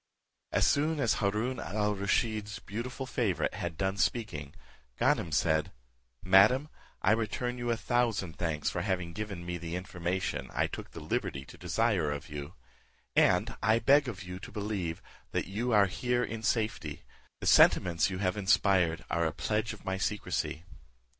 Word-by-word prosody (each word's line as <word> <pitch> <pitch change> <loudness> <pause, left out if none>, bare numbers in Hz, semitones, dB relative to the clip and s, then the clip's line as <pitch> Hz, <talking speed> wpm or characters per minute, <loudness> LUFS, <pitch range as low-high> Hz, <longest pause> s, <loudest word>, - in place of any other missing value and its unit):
As - - +3
soon 150 +2 +2
as 115 -5 +2
Haroon 110 +5 0
al 105 +3 -1
Rusheed's 100 +1 0
beautiful 125 +6 -5
favourite 115 -8 0
had 85 -6 -4
done 95 0 -1
speaking, 85 - -1 0.4
Ganem 80 - +2
said, 80 0 +2 0.5
"Madam, 105 +10 +5 0.3
I 95 - +4
return 120 +2 -1
you 120 0 -2
a 115 - +1
thousand 115 -9 0
thanks 80 -3 -1
for 85 - -2
having 90 -3 -2
given 100 -4 -5
me 90 0 -3
the 85 +1 -5
information 90 0 -3
I - - +2
took - - -6
the - - -9
liberty 70 0 -2
to - - -13
desire 105 -9 +1
of 75 0 -5
you; 75 +4 -7 0.6
and - - +3
I 110 +2 +4
beg 140 +5 +4
of 100 -6 -5
you 90 0 -7
to - - -10
believe, 100 -6 -3 0.3
that - - 0
you 115 +6 -2
are 105 -3 +6
here 125 +6 0
in 115 -1 -4
safety; 105 - -1 0.4
the - - -6
sentiments 85 -1 +5
you 95 - -4
have 95 +1 0
inspired 95 -4 +3
are 85 -1 +2
a - - -1
pledge 105 +7 -1
of - - -11
my 95 0 -2
secrecy. 95 -5 -2
100 Hz, 165 wpm, -30 LUFS, 85-115 Hz, 0.6 s, are